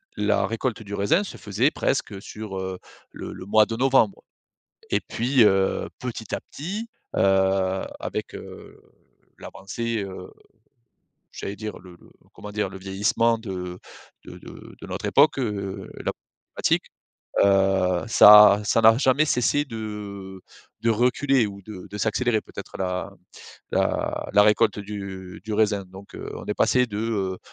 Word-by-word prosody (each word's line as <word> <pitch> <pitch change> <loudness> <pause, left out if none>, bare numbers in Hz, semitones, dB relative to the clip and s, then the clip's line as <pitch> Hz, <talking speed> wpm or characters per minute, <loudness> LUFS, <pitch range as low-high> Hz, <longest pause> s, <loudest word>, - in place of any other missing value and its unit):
la 105 0 +1
récolte 115 0 -3
du 100 -1 -9
raisin 100 - +2
se 200 - -8
faisait 110 +7 0
presque 100 -7 -2
sur, 105 -2 -8
heu, 95 0 -4 0.3
le - - -8
le - - -9
mois 110 +1 +5
de 115 - -4
novembre. 135 +9 +2 0.7
Et - - +2
puis, 125 +2 +1
heu, 95 -2 +2
petit 115 -4 -5
à - - -3
petit, 205 +10 -5 0.3
heu, 95 0 +2 0.2
avec, - - -5
heu, - - -11 0.6
l'avancée, 115 +3 -4
heu, 95 -1 -9 1.0
j'allais 100 - -6
dire 110 0 -6
le 90 0 -14
le - - -19 0.2
comment 105 - -10
dire? 105 -1 -1
Le 95 - -9
vieillissement 105 +4 +1
de 90 -4 -6 0.5
de - - -10
de - - -12
notre - - -6
époque, 145 +1 +4
heu, 100 -5 -3 0.2
la - - 0
problèmatique - - -3 0.6
heu, 95 -2 +3
ça 105 -2 +9
à 105 +1 -4
ça 110 - +2
n'a 110 0 +7
jamais 135 +2 +3
cessé 145 +2 +2
de 105 -4 -7 0.4
de 115 - +2
reculer, 125 +2 +2
ou 100 -1 -8
de 95 -2 -10
de 105 - -6
s'accélérer, 110 +2 +1
peut-être - - -10
la 90 -1 -2 0.6
la - - -1
la 105 - +6
récolte 105 +1 +3
du 100 -3 -7
du 110 - -5
raisin 105 -2 +1
donc 95 +2 -14
heu, - - -7
on - - -9
est - - -2
passé 125 0 +3
de, 105 -3 -7
heu, 100 -5 -2
105 Hz, 155 wpm, -24 LUFS, 95-115 Hz, 1.0 s, ça